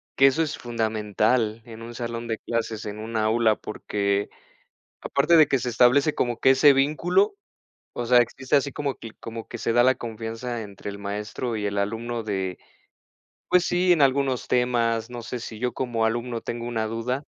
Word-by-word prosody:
que 135 Hz, -, +5 dB
eso 135 Hz, +4 st, +4 dB
es 155 Hz, -2 st, -2 dB
fundamental 110 Hz, 0 st, 0 dB
en 115 Hz, -1 st, -10 dB
un 120 Hz, +1 st, -8 dB
salón 120 Hz, 0 st, -5 dB
de 110 Hz, -1 st, -2 dB
clases 110 Hz, -2 st, -3 dB
en 105 Hz, -, -6 dB
una 110 Hz, 0 st, -2 dB
aula, 110 Hz, 0 st, +3 dB
porque 100 Hz, -1 st, -2 dB, 0.7 s
aparte 150 Hz, +5 st, +3 dB
de 155 Hz, -, +7 dB
que 135 Hz, -, +1 dB
se 125 Hz, -, -3 dB
establece 125 Hz, +6 st, +4 dB
como 120 Hz, -2 st, -1 dB
que 130 Hz, -, +5 dB
ese 140 Hz, +2 st, +6 dB
vínculo, 165 Hz, +9 st, +2 dB, 0.6 s
o 120 Hz, -, -4 dB
sea, 125 Hz, +1 st, +6 dB
existe 130 Hz, +3 st, 0 dB
así 140 Hz, 0 st, +2 dB
como 140 Hz, -1 st, -3 dB
que 115 Hz, -, -10 dB
como 115 Hz, 0 st, -7 dB
que 120 Hz, -, -6 dB
se 115 Hz, 0 st, -1 dB
da 120 Hz, -, +5 dB
la 130 Hz, +1 st, +4 dB
confianza 115 Hz, +1 st, -5 dB
entre 100 Hz, -1 st, -8 dB
el 100 Hz, 0 st, -8 dB
maestro 105 Hz, +4 st, -4 dB
y 105 Hz, -, -3 dB
el 100 Hz, 0 st, -2 dB
alumno 115 Hz, +3 st, -2 dB
de, 95 Hz, -3 st, -3 dB, 0.9 s
pues, 180 Hz, -1 st, +4 dB
sí, 180 Hz, 0 st, +3 dB
en 170 Hz, -, +2 dB
algunos 135 Hz, -2 st, +2 dB
temas. 120 Hz, -2 st, +1 dB
No 120 Hz, -, -6 dB
sé, 120 Hz, +2 st, -5 dB
si 115 Hz, -2 st, -8 dB
yo 125 Hz, +2 st, -1 dB
como 120 Hz, -3 st, 0 dB
alumno 120 Hz, +1 st, -2 dB
tengo 120 Hz, +1 st, -5 dB
una 115 Hz, -2 st, -1 dB
duda, 125 Hz, +5 st, -3 dB
120 Hz, 190 wpm, -25 LUFS, 110-130 Hz, 0.9 s, de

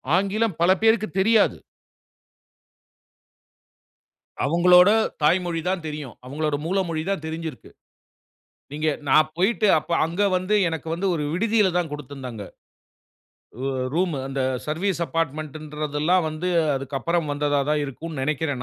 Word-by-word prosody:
ஆங்கிலம் 200 Hz, 0 st, 0 dB
பலபேருக்குத் 215 Hz, +3 st, +3 dB
தெரியாது. 220 Hz, +2 st, +3 dB, 2.9 s
அவங்களோட 180 Hz, +4 st, +6 dB, 0.3 s
தாய்மொழி 170 Hz, +1 st, +2 dB
தான் 185 Hz, -3 st, -2 dB
தெரியும். 150 Hz, -5 st, -6 dB
அவங்களோட 150 Hz, +2 st, -2 dB
மூல 185 Hz, +4 st, 0 dB
மொழி 160 Hz, -1 st, -2 dB
தான் 195 Hz, -5 st, -2 dB
தெரிஞ்சிருக்கு. 160 Hz, 0 st, -6 dB, 1.0 s
நீங்க 155 Hz, +2 st, -2 dB, 0.2 s
நான் 155 Hz, +2 st, +4 dB
போயிட்டு 195 Hz, +3 st, +2 dB
அப்ப 160 Hz, -, -11 dB
அங்க 170 Hz, +5 st, -3 dB, 0.2 s
வந்து 185 Hz, +3 st, 0 dB
எனக்கு 160 Hz, -1 st, -5 dB
வந்து 190 Hz, +3 st, -1 dB
ஒரு 150 Hz, -, -2 dB
விடுதியில 210 Hz, +2 st, +2 dB
தான் 170 Hz, -3 st, -1 dB
குடுத்திருந்தாங்க. 135 Hz, -6 st, -7 dB, 1.2 s
அ 135 Hz, -, -2 dB, 0.3 s
ரூமு, 170 Hz, -4 st, 0 dB
அந்த 135 Hz, 0 st, -3 dB, 0.3 s
சர்வீஸ் 170 Hz, +3 st, -1 dB
அப்பார்ட்மென்ட்ன்றதெல்லாம் 155 Hz, +1 st, -1 dB
வந்து 155 Hz, +4 st, -3 dB, 0.3 s
அதுக்கப்பறம் 145 Hz, +4 st, -2 dB
வந்ததா 145 Hz, 0 st, +1 dB
தான் 150 Hz, -1 st, +1 dB
இருக்கும்னு 150 Hz, +1 st, -6 dB
நெனைக்கிறேன். 145 Hz, -2 st, -1 dB
160 Hz, 115 wpm, -23 LUFS, 150-185 Hz, 2.9 s, அவங்களோட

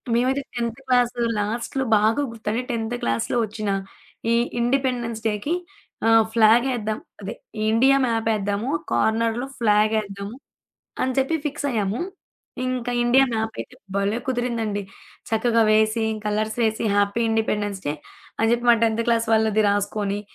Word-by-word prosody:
మేవైతే 260 Hz, +3 st, +1 dB
10థ్ 235 Hz, +1 st, -3 dB
క్లాస్ 245 Hz, -1 st, +3 dB, 0.3 s
లాస్ట్‌లో 235 Hz, +5 st, -2 dB
బాగా 220 Hz, +6 st, +2 dB
గుర్తు 225 Hz, -2 st, -12 dB
అంటే 235 Hz, +3 st, 0 dB
10థ్ 230 Hz, +1 st, -2 dB
క్లాసులో 115 Hz, -, 0 dB
వచ్చిన 215 Hz, -1 st, -4 dB, 0.6 s
ఈ -, -, +4 dB, 0.2 s
ఇండిపెండెన్స్ 240 Hz, -2 st, 0 dB
డేకి 215 Hz, +10 st, -1 dB, 0.5 s
ఆహ్, 225 Hz, 0 st, +6 dB
ఫ్లాగేద్దాం. 225 Hz, -1 st, +3 dB, 0.2 s
అదే 200 Hz, +2 st, -5 dB, 0.4 s
ఇండియా 265 Hz, +5 st, +5 dB
మ్యాపేద్దాము, 220 Hz, 0 st, 0 dB, 0.2 s
కార్నర్‌లో 230 Hz, +3 st, +1 dB
ఫ్లాగేద్దాము 210 Hz, -1 st, +1 dB, 0.7 s
అని 260 Hz, -, 0 dB
చెప్పి 270 Hz, +5 st, +2 dB
ఫిక్సయ్యాము. 245 Hz, -7 st, -1 dB, 0.7 s
ఇంక 250 Hz, -1 st, -2 dB, 0.2 s
ఇండియా 260 Hz, +3 st, +5 dB
మ్యాపయితే 220 Hz, +3 st, -4 dB, 0.2 s
భలే 200 Hz, +3 st, 0 dB
కుదిరిందండి. 235 Hz, -5 st, -1 dB, 0.5 s
చక్కగా 230 Hz, +1 st, +3 dB
వేసి, 220 Hz, +1 st, +3 dB, 0.2 s
కలర్స్‌ 215 Hz, +2 st, -1 dB
ఏసి, 220 Hz, +1 st, -1 dB
హ్యాపీ 205 Hz, +3 st, +2 dB
ఇండిపెండెన్స్ 210 Hz, -3 st, -1 dB
డే 145 Hz, -, 0 dB, 0.4 s
అని 225 Hz, -, +2 dB
జెప్పి 240 Hz, 0 st, +1 dB
మా 235 Hz, -, +8 dB
10థ్ 225 Hz, 0 st, +2 dB
క్లాస్ 230 Hz, -1 st, +2 dB
వాళ్ళది 220 Hz, -1 st, +3 dB
రాసుకొని, 205 Hz, 0 st, -1 dB
225 Hz, 125 wpm, -23 LUFS, 215-240 Hz, 0.7 s, మా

